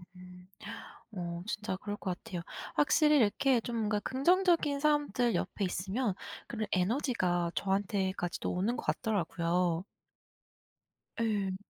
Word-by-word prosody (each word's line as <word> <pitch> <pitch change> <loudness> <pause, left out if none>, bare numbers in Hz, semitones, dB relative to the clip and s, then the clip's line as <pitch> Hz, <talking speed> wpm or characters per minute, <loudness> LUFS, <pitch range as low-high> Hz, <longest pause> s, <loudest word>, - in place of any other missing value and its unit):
음. 180 0 -13 0.7
어 175 -3 -4
진짜 215 -3 -2
그럴 205 +2 -5
것 185 -3 -3
같아요. 175 -2 -5 0.3
확실히 300 +1 +4
이렇게 245 +2 +3
좀 235 +1 -4
뭔가 215 -2 +1
긍정적인 310 - +3
사람들 290 -5 +2
옆에 205 - -1
있으면 190 +5 -1 0.3
그런 220 -2 -3
에너지가 185 - +1
저한테까지도 190 -2 -1
오는 205 +7 0
것 - - -5
같더라고요. 175 -3 0 1.4
예. 205 -4 0
205 Hz, 265 characters per minute, -32 LUFS, 180-245 Hz, 1.4 s, 확실히